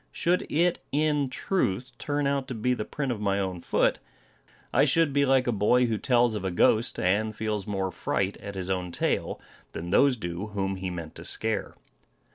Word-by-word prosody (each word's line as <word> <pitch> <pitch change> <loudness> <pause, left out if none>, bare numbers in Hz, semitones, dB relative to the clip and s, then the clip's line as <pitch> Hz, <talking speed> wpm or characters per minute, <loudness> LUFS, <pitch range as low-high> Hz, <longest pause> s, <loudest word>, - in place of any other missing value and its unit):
Should 175 +2 0
it 170 +3 +2
in 150 -1 +1
truth 130 - -1
turn 145 0 -1
out 140 -1 0
to 130 - -5
be 125 +3 +1
the 115 - -2
print 140 -3 -3
of 110 -3 -4
my 100 -1 +1
own 95 -3 -3
foot, - - +1 0.7
I - - +5
should 165 -4 +3
be 140 0 +3
like 130 -1 +4
a 120 - +1
boy 120 +4 +3
who 110 -3 -1
tells 120 -3 +3
of 105 - -3
a 95 - 0
ghost, 110 +5 +2
and 105 +4 +1
feels 105 -2 -2
more 95 -2 -1
fright 100 +2 -1
at 100 -1 -8
his 95 0 -2
own 90 -2 -2
tale, - - -1 0.3
than 85 +2 -5
those 135 +5 +4
do 85 0 -4
whom 95 -1 -1
he 95 0 -3
meant 85 -3 -6
to - - -8
scare. 110 -1 -2
110 Hz, 200 wpm, -27 LUFS, 95-135 Hz, 0.7 s, I